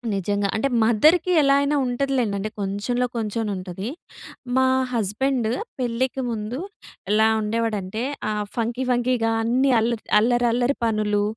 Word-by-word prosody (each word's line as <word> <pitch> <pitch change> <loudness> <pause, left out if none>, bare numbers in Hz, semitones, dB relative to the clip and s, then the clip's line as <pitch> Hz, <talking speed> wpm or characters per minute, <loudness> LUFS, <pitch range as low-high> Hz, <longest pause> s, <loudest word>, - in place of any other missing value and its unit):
నిజంగా. 200 +1 0
అంటే 220 +5 +1 0.2
మదర్‌కి 310 - +4
ఎలా 275 -1 +4
అయినా 285 +1 +1
ఉంటదిలెండి. 250 -4 0
అంటే 210 +2 -3
కొంచెంలో 205 +6 -1
కొంచెమైన 220 -1 -2
ఉంటది. 185 +3 -6 0.7
మా 260 0 +4 0.3
హస్బెండ్ 235 +3 0 0.3
పెళ్ళికి 255 +2 -1
ముందు 220 +3 -4 0.5
ఎలా 220 +1 +4
ఉండేవాడంటే, 215 -1 -2 0.3
ఆహ్, 210 -1 -2
ఫంకీ 235 +2 -1
ఫంకీగా 240 -2 +1
అన్ని 255 +4 +2
అల్లర్ 230 0 -1 0.2
అల్లరల్లరి 240 +3 +2
పనులు, 210 -2 +1
230 Hz, 120 wpm, -23 LUFS, 210-250 Hz, 0.7 s, మదర్‌కి